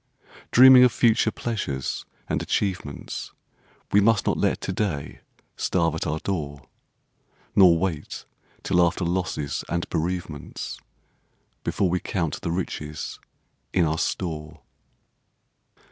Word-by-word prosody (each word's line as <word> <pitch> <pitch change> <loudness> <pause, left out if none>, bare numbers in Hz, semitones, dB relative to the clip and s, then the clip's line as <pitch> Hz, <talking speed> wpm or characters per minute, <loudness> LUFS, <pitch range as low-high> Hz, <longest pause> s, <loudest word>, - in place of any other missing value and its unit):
Dreaming 130 0 +9
of 125 - +6
future 115 -1 +3
pleasures 100 - -3 0.2
and - - -1
achievements 90 -8 -3 0.6
We 105 - +5
must 110 0 +3
not - - +2
let - - +1
to 95 - -3
day 90 -8 -3 0.3
starve 85 -3 +1
at 80 - -3
our 75 - -1
door; 75 -7 -4 0.9
Nor 90 -4 +7
wait 80 -4 -3 0.4
till 90 -2 +3
after 85 +1 +1
losses 85 -5 -2
and 85 -1 -1
bereavements 85 -3 -4 0.8
Before 95 - +1
we 90 - +1
count 85 -6 -2
the 90 - -3
riches 75 -4 -4 0.5
in 90 -3 +3
our 80 +1 0
store. 80 -4 -3
85 Hz, 115 wpm, -25 LUFS, 75-95 Hz, 0.9 s, Dreaming